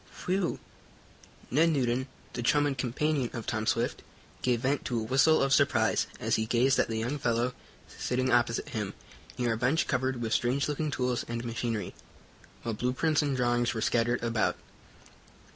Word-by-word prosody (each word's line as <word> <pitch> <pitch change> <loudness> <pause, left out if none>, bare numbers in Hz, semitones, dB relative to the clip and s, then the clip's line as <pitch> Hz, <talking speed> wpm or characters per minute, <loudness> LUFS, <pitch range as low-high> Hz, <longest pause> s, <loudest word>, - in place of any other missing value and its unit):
"Whew!" 185 -1 0 0.9
Ned 160 +6 +4
Newton, 130 -3 0 0.3
the 120 - -3
chum 145 +5 +3
and 140 -2 0
companion 130 +1 0
of 115 -2 -5
Tom 110 -1 -2
Swift, - - 0 0.4
gave 120 -2 +1
vent 135 +2 0
to 120 -2 -1
a - - -3
whistle 135 +7 +4
of 135 0 +2
surprise, - - +3
as - - +1
he 110 0 -1
gazed 125 +4 +3
at - - +3
the 115 - -3
young 125 +6 -2
fellow 120 -1 0 0.3
sitting 130 +1 -1
opposite 120 -1 +2
him, 105 -3 -4 0.4
near 120 -2 +1
a - - -3
bench 130 +8 +2
covered 130 -1 -1
with 115 -1 -2
strange 130 +3 +1
looking 150 +1 -1
tools 125 -3 -1
and 120 +1 -4
machinery, 115 -2 -3 0.7
while 115 - -2
blueprints 130 +8 +1
and 140 -3 -1
drawings 120 -1 +1
were 110 - -2
scattered 120 +1 +1
about. 115 -1 +1
125 Hz, 170 wpm, -29 LUFS, 115-135 Hz, 0.9 s, Ned